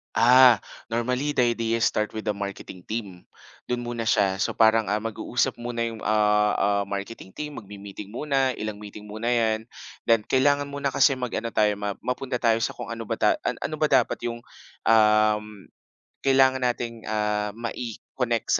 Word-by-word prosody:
Ah, 120 -2 +7 0.3
normally 125 +5 -1
the 120 -1 +3
idea 115 0 -1
start 105 0 0
with 110 - -4
the 105 - 0
marketing 100 -2 -7
team, 100 -5 -6 0.4
do'n 120 0 -2
muna 120 -1 -4
siya. 100 -4 +2
So, - - -1
parang, 110 -1 +4
ah, 105 +2 0
mag-uusap 120 +3 -1
muna 120 -1 -3
yung, 115 -1 -4
ah, 105 0 +3
ah, 100 0 +1
marketing 100 -1 -6
team, 150 -1 -6
magme-meeting 100 -1 -10
muna, 135 +2 0
ilang 110 -1 -5
meeting 105 0 -10
muna 110 +3 -5
yan. 115 -2 +2 0.5
Then, 115 -2 +4
kailangan 140 +4 +2
muna 140 -1 -2
kasi 135 - +4
mag-ano 115 -2 -3
tayo, 105 -1 +3
ma 100 0 -3
mapunta 125 0 -3
tayo 115 -1 +3
sa - - 0
kung - - -7
ano 115 0 -5
ba - - -4
tay - - +4
a - - 0 0.2
ano 155 - -5
ba 155 0 +1
dapat 130 -3 +3
yung, 120 0 -3 0.5
um, 105 -1 +4 0.8
kailangan 130 -1 +4
nating, 120 -2 -2
ah, 105 -1 0
mai-connect 120 0 -3
115 Hz, 170 wpm, -25 LUFS, 105-125 Hz, 0.8 s, Ah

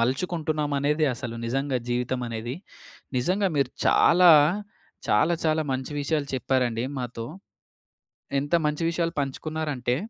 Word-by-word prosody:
మలుచుకుంటున్నాం 150 +3 -1
అనేది, 150 +3 +1
అసలు 115 0 -6
నిజంగా 135 +2 -1
జీవితమనేది, 120 -1 -2 0.6
నిజంగా 185 +9 +1
మీరు 140 - +1 0.2
చాలా 175 0 +6 0.8
చాలా 130 +11 +3
చాలా 155 0 +2
మంచి 130 +2 -4
విషయాలు 145 0 -1
చెప్పారండి 125 -3 0
మాతో. 120 -2 -5 1.1
ఎంత 145 +3 -6
మంచి 150 +2 -1
విషయాలు 165 0 -1
పంచుకున్నారంటే, 140 -2 -2
140 Hz, 105 wpm, -26 LUFS, 125-155 Hz, 1.1 s, చాలా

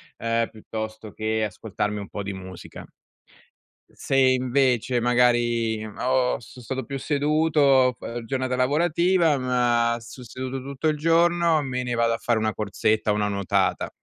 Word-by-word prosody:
ehm, 115 0 0
piuttosto 110 0 -7
che 110 +1 -2
ascoltarmi 105 0 -3
un 100 - -7
po' 100 - -6
di 100 - -4
musica 95 -2 -10 1.1
se - - -2
invece, 130 -1 +2
magari, 120 -2 +2
ho 125 +4 0
so' 120 +2 -13
stato 130 +3 -4
più 140 +4 -5
seduto 145 -2 +3
f - - -15
ehm, 115 0 -5
giornata 130 0 -2
lavorativa, 165 +4 +2
ma 120 -2 +1
sto 120 +3 -11
seduto 130 +2 -6
tutto 140 +3 -3
il 155 -1 +1
giorno, 165 0 +3
me 125 -2 -3
ne 125 -1 -3
vado 115 -1 +2
a - - -1
fare 120 -2 0
una 110 0 -1
corsetta, 110 +1 0
o - - +2
una 105 0 0
nuotata. 100 -2 0
125 Hz, 155 wpm, -24 LUFS, 110-135 Hz, 1.1 s, seduto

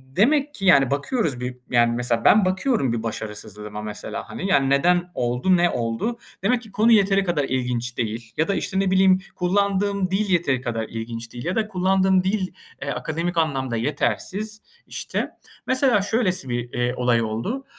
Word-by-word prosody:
demek 285 +7 +3
ki 195 - -5
yani, 140 -8 +5
bakıyoruz 145 - -1
bir, 125 0 -5
yani, 120 -1 +3
mesela, 120 -1 -1
ben 210 -2 +6
bakıyorum 185 - +1
bir 115 -1 -3
başarısızlığıma 105 -1 -6
mesela, 105 -1 -6
hani, 190 - -4
yani, 135 -6 +3
"Neden 175 +6 +3
oldu, 125 +10 +2
ne 175 0 +3
oldu?" 120 - -2 0.2
Demek 235 +4 +2
ki 220 -3 -14
konu 220 +4 +3
yeteri 195 -2 +4
kadar 175 -6 0
ilginç 125 -2 -2
değil 115 0 -4
ya 160 - +2
da, 200 - 0
işte, 190 - -1
ne 195 -1 +1
bileyim, 190 0 +5 0.2
kullandığım 200 +1 0
dil 200 +2 0
yeteri 165 -8 +1
kadar 115 -3 -2
ilginç 115 0 -6
değil. 120 +3 -7
Ya 180 - -1
da 220 -1 0
kullandığım 190 -1 +2
dil, 190 0 0 0.4
ııı, 140 - -2
akademik 170 +2 -3
anlamda 135 -6 0
yetersiz 205 - -2 0.3
işte. - - -3 0.4
Mesela 255 -5 +3
şöylesi 190 - 0
bir, 120 0 -3
eee, 120 0 0
olay 125 -2 +2
oldu: 115 - -3
170 Hz, 170 wpm, -23 LUFS, 120-195 Hz, 0.4 s, ben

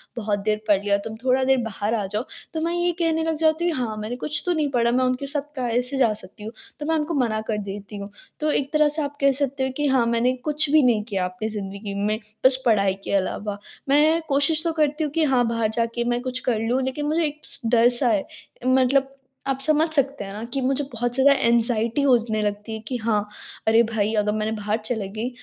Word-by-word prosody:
बहुत 210 -3 -1
देर 210 +1 0
पढ़ 200 -2 +4
लिया 200 -1 +2
तुम 220 - -5
थोड़ा 260 0 +2
देर 265 0 +3
बाहर 215 0 -2
आ 210 -3 -1
जाओ 215 +4 -1 0.3
तो 320 - -2
मैं 335 +1 0
ये 350 0 +1
कहने 325 -1 +1
लग 325 0 0
जाती 320 +2 +2
हूँ 320 - -2
हाँ 230 -4 -2
,मैंने 215 +3 -4
कुछ 300 +4 -3
तो 355 - +2
नहीं 305 -3 0
पढ़ा 235 -2 +2
मैं 255 +1 +2
उनके 255 +2 -1
साथ 285 +1 -1
कैसे 250 +1 -1
जा 245 -5 +4
सकती 210 +1 -9
हूँ? 220 - -6 0.3
तो 295 - -4
मैं 320 +1 +1
उनको 315 +1 -1
मना 215 -2 -1
कर 215 - 0
देती 205 0 -7
हूँ। 200 0 -7 0.3
तो 305 0 +1
एक 280 -1 -1
तरह 305 -1 +4
से - - +1
आप 285 0 -5
कह 275 0 +5
सकते 275 -1 -1
हो 265 - 0
कि 295 0 +1
हाँ 260 -3 +3
मैंने 235 +2 +2
कुछ 300 0 0
भी 310 0 +6
नहीं 230 -4 +3
किया 190 -3 0
अपने 185 +4 -4
ज़िन्दगी 200 -1 -6
में 215 +1 0 0.3
बस 260 0 +6
पढ़ाई 200 -5 +3
के - - -4
अलावा। 200 +1 -1 0.3
मैं 305 +4 +4
कोशिश 285 +3 +3
तो 335 - +2
करती 305 0 +1
हूँ 300 - -2
कि 320 +2 +1
हाँ, 260 -5 +3
बाहर 230 -1 0
जाके 230 +1 -1
मैं 240 0 0
कुछ 255 0 -4
कर 225 -3 +1
लूँ 250 +3 +1
लेकिन 265 +3 -3
मुझे 315 +3 +1
एक 300 0 -4 0.2
डर-सा 240 +2 +3
है। 205 -3 +1 0.4
मतलब 265 +1 +3 0.3
आप 270 -1 -1
समझ 310 +2 +3
सकते 280 -5 +1
हैं 195 - -8
ना 210 +2 -6
कि 275 - 0
मुझे 270 +2 0
बहुत 240 +1 -2
ज़्यादा 270 +2 +5
एंग्ज़ायटी 235 +1 +2
होने 235 -5 +2
लगती 210 +1 -3
है 220 - -4
कि, 255 - -2
"हाँ 215 -2 0 0.4
अरे 225 +1 +6
भाई!" 220 -1 -1
अगर 210 0 +1
मैंने 215 +1 -1
बाहर 210 +1 -1
चली 220 -4 -2
गई 220 +4 -3
245 Hz, 235 wpm, -23 LUFS, 215-285 Hz, 0.4 s, भी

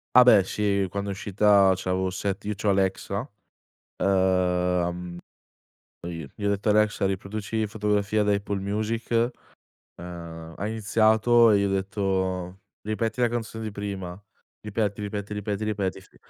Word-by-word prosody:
A 125 - +10
beh 110 -6 +7
sì 100 0 0
quando 100 0 -3
è - - -1
uscita 100 -1 +4
c'avo 95 0 -1
set 100 +2 -3
io 105 - -1
c'ho 105 +1 -1
Alexa. 100 +3 0 0.7
Ehm, 90 -2 +1 0.8
poi 80 -5 -7
gli 105 - -8
ho - - +3
detto: 100 +1 -1
"Alexa 105 -1 +3
riproduci 105 +3 -2
'Fotografia' 105 -1 0
da 105 0 +2
Apple 100 0 -2
Music", 110 +3 -2 0.9
ehm, 85 -2 -8
ha 100 - -3
iniziato 110 +2 +4
e 105 - +5
gli 100 - +1
ho 100 - 0
detto: 95 -2 -1 0.2
"Ripeti 110 +3 -2
la 120 - +4
canzone 115 -1 -4
di 110 - -4
prima. 95 -3 -5 0.4
Ripeti, 105 -1 -2
ripeti, 105 0 -4
ripeti, 105 0 -3
ripeti," 100 -3 -2
sì. - - -22
100 Hz, 145 wpm, -26 LUFS, 95-105 Hz, 0.9 s, A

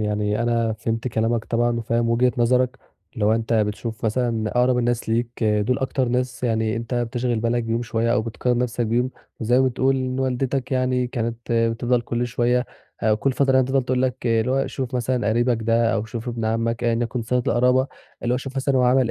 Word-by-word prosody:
يعني 105 +1 0
أنا 115 -1 +1
فهمت 115 +2 -3
كلامك 115 0 0
طبعًا 120 0 +1
وفاهم 115 0 0
وجهة 125 +2 +3
نظرك 125 +2 +2 0.4
اللي 110 -4 -1
هو 105 - +4
أنت 115 +1 -1
بتشوف 110 +1 -1
مثلًا 115 -1 0
أقرب 125 0 +3
الناس 120 -1 0
ليك 115 +1 -1
دُول 105 +4 +1
أكتر 130 -1 -1
ناس 125 0 -2
يعني 110 -1 0
أنت 115 +2 -4
بتشغل 120 -1 -1
بالك 120 +1 0
بيهم 115 +1 -1
شوية 115 0 0
أو - - +2
بتقارن 120 +2 -1
نَفْسك 120 -1 -1
بيهم 120 +3 +1 0.3
وزي 120 +2 +3
ما 130 - +4
بتقول 130 +2 +1
إن 130 0 -2
والدتك 130 +1 -1
يعني 130 -1 +1
كانت 120 -2 -3 0.2
بتفضل 115 +2 +1
كل 120 +1 -2
شوية 120 +1 +1 0.4
ه 110 -1 +3
كل 130 +5 0
فترة 135 0 +2
يعني 130 -1 +4
تفضل 135 0 +1
تقول 125 0 0
لك 130 -1 -2
اللي 115 +1 +2
هو 135 +1 +1
"شوف 130 -2 -4
مثلًا 125 -3 0
قريبك 120 +1 +2
ده 115 0 +2
أو 110 -1 -1
شوف 115 +2 -6
ابن 115 -2 -3
عمّك،" 115 +1 -1
ايًا 115 -1 +2
يَكُن 120 +1 -2
صِلة 125 +3 0
القرابة 125 +2 +3 0.4
اللي 120 +1 +1
هو - - +1
شوف 135 0 -8
مثلًا 130 -2 +2
عمل 125 -1 +3
120 Hz, 205 wpm, -23 LUFS, 115-125 Hz, 0.4 s, هو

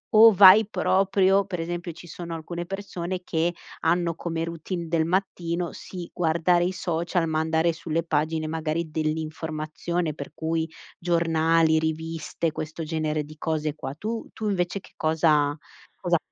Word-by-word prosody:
o 225 +1 +10
vai 195 +2 +9
proprio 195 0 +3
per 180 -3 -4
esempio 175 +1 -4
ci 170 - -12
sono 170 0 -6
alcune 170 +2 -5
persone, 185 -2 -4
che 170 0 0 0.3
hanno 170 +1 +2
come 165 -1 -3
routine 170 +1 -4
del 160 -1 +2
mattino, 175 -1 -1
sì, 180 -2 -8
guardare 175 +1 +2
i 180 - 0
social, 170 -1 -1
ma 155 0 +1
andare 160 +1 +2
sulle 165 0 -2
pagine 155 0 0
magari 160 0 -2
dell'informazione, 155 +1 -2
per - - -8
cui 160 0 -1 0.3
giornali, 165 -1 +3
riviste, 160 +1 -2
questo 155 +2 -5
genere 155 -1 -1
di 155 +1 -12
cose 155 -1 -1
qua, 135 - -5
tu 220 +7 -4
tu 215 -1 -2
invece 185 0 -1
che - - -18
cosa 155 -2 +2 0.4
cosa - - +3
165 Hz, 145 wpm, -25 LUFS, 160-175 Hz, 0.4 s, o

